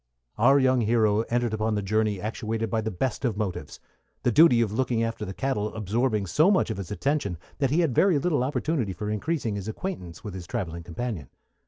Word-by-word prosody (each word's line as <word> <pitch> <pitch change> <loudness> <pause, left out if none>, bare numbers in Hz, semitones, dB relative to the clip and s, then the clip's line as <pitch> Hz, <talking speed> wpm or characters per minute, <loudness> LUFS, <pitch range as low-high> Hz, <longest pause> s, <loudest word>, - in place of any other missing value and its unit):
Our 135 +5 +6
young 130 -2 +3
hero 110 -1 +3
entered 120 -1 0
upon 110 0 0
the 105 - -1
journey 105 0 +1
actuated 110 +1 -3
by 110 - +1
the 110 - -2
best 110 +6 -2
of 115 -6 0
motives, 105 -4 -4 0.4
the 120 - +3
duty 145 -2 +6
of 115 -3 +1
looking 115 0 0
after 115 0 -3
the 95 - -5
cattle 110 -6 -2
absorbing 110 +1 0
so 155 - +3
much 190 - +2
of 110 - -4
his 95 -3 -6
attention 105 - -1 0.2
that 135 -2 +2
he 155 +6 +2
had 160 -7 +1
very 180 +4 +4
little 145 -3 +1
opportunity 130 - -1
for 105 +2 -4
increasing 115 +1 -1
his 100 0 -5
acquaintance 110 - -5
with 105 - -6
his 90 -3 -7
travelling 85 -8 -4
companion. 85 - -5
110 Hz, 205 wpm, -26 LUFS, 105-130 Hz, 0.4 s, Our